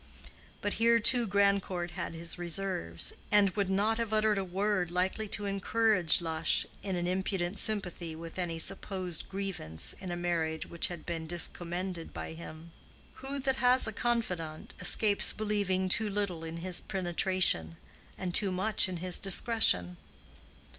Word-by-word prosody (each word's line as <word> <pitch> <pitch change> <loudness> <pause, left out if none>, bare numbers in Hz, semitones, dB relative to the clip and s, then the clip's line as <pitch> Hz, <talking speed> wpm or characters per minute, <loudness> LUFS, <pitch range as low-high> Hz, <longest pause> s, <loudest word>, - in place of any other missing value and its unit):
But 205 - -1
here 230 0 +5
too 240 +1 +3
Grandcourt 195 -3 +1
had 175 -2 -5
his 170 +2 -3
reserves, 170 - 0 0.2
and 205 -2 +5
would 200 0 -1
not 210 +4 +1
have 230 -2 -2
uttered 215 -1 +2
a - - -1
word 190 0 -1
likely 185 +5 -1
to 205 0 -2
encourage 200 -3 +3
Lush 160 -1 0 0.2
in 195 -2 -3
an 175 0 -2
impudent 185 +1 -2
sympathy 180 -6 -3
with 165 +2 -9
any 170 -2 -3
supposed 185 -1 -1
grievance 185 - -5
in 190 - -7
a 175 - -3
marriage 165 -2 -2
which 170 - -1
had 175 -3 -8
been 165 -2 -4
discommended 175 +1 -1
by - - -6
him. 165 0 -10 0.5
Who 270 +1 -4
that 265 0 0
has 250 +1 +5
a 220 - -1
confidant 180 -10 -3
escapes 205 -2 +5
believing 200 -3 -1
too 210 +3 +3
little 195 -5 -3
in 165 0 -6
his 175 +1 +1
penetration, 175 - 0 0.4
and 180 -2 -4
too 200 0 +3
much 190 +1 +2
in 180 - -4
his 180 +1 0
discretion? 190 - +2
185 Hz, 155 wpm, -30 LUFS, 170-205 Hz, 0.5 s, here